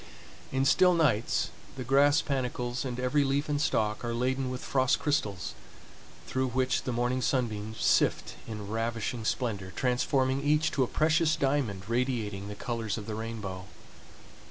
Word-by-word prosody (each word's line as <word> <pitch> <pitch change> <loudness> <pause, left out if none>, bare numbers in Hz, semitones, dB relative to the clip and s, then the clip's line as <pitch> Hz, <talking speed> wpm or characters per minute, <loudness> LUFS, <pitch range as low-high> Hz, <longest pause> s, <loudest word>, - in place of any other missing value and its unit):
In 135 0 +1
still 180 +5 +5
nights 130 -10 +1 0.2
the 130 - -5
grass 140 +4 +4
panicles 125 -2 -2
and 125 -1 -4
every 125 +3 +2
leaf 140 +2 0
and 145 -1 0
stalk 110 -8 0
are 120 0 -2
laden 130 +2 0
with 125 -1 -5
frost 130 -1 +2
crystals, 105 - -1 0.7
through 130 0 -1
which 130 +1 0
the 125 - -1
morning 120 +2 0
sunbeams 110 -5 -1
sift - - +2
in 105 -2 -6
ravishing 115 +1 -2
splendor, 105 -5 -2
transforming 130 +1 +1
each 150 +2 +2
to 135 - 0
a 130 - +3
precious 155 +2 +2
diamond 130 -9 -1
radiating 115 -5 -1
the 105 - -6
colors 115 -2 -3
of 105 - -6
the 110 - -5
rainbow. 105 -4 -5
125 Hz, 155 wpm, -29 LUFS, 110-135 Hz, 0.7 s, still